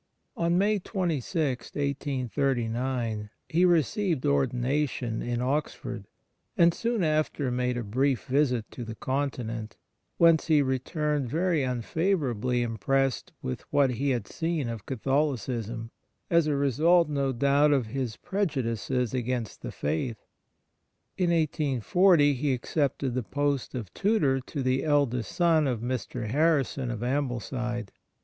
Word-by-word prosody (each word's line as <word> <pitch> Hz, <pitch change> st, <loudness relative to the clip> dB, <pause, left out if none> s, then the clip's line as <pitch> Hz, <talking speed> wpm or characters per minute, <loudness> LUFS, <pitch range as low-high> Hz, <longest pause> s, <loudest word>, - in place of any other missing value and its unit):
On 170 Hz, +1 st, +1 dB
May 205 Hz, +2 st, +2 dB
26, 160 Hz, -, -2 dB
1839, 130 Hz, -5 st, -1 dB, 0.2 s
he 175 Hz, +3 st, +3 dB
received 175 Hz, -, +2 dB
ordina 140 Hz, 0 st, +1 dB
tion 115 Hz, -3 st, -4 dB
in 120 Hz, 0 st, -2 dB
Oxford, 125 Hz, -5 st, -2 dB, 0.5 s
and 170 Hz, 0 st, +5 dB
soon 230 Hz, -1 st, -1 dB
after 155 Hz, -4 st, 0 dB
made 125 Hz, 0 st, 0 dB
a 120 Hz, -, -2 dB
brief 130 Hz, +4 st, 0 dB
visit 130 Hz, -4 st, +1 dB
to 120 Hz, -, -7 dB
the 115 Hz, -1 st, -7 dB
Continent, 120 Hz, -5 st, -3 dB, 0.4 s
whence 165 Hz, -2 st, +5 dB
he 155 Hz, -3 st, +4 dB
returned 140 Hz, +1 st, -1 dB
very 165 Hz, +2 st, +1 dB
unfavourably 125 Hz, -, 0 dB
impressed 130 Hz, +4 st, 0 dB
with 65 Hz, -, -3 dB
what 140 Hz, -3 st, +4 dB
he 140 Hz, +4 st, -1 dB
had 120 Hz, -6 st, -1 dB
seen 160 Hz, -6 st, -2 dB
of 115 Hz, -4 st, -6 dB
Catholicism, 120 Hz, -4 st, -1 dB, 0.4 s
a 170 Hz, 0 st, +6 dB
result, 150 Hz, +5 st, +3 dB
no 140 Hz, -2 st, 0 dB
doubt, 140 Hz, +4 st, +3 dB
of 135 Hz, -4 st, +2 dB
his 120 Hz, 0 st, -4 dB
prejudices 130 Hz, -, -1 dB
against 125 Hz, -3 st, -2 dB
the -, -, -5 dB
faith. 80 Hz, -, -2 dB, 1.0 s
In 180 Hz, -2 st, +1 dB
1840 155 Hz, -, +3 dB
he 140 Hz, +1 st, 0 dB
accepted 135 Hz, 0 st, -1 dB
the 130 Hz, -, 0 dB
post 140 Hz, +2 st, -1 dB
of 110 Hz, -7 st, -6 dB
tutor 160 Hz, -11 st, +2 dB
to 135 Hz, +2 st, -5 dB
the 130 Hz, +1 st, +1 dB
eldest 140 Hz, -8 st, +1 dB
son 165 Hz, -4 st, +3 dB
of 120 Hz, -4 st, -1 dB
Mr. 120 Hz, -1 st, -3 dB
Harrison 140 Hz, -1 st, +1 dB
of 120 Hz, -1 st, -4 dB
Ambleside. 120 Hz, -4 st, -2 dB
135 Hz, 130 wpm, -27 LUFS, 120-150 Hz, 1.0 s, a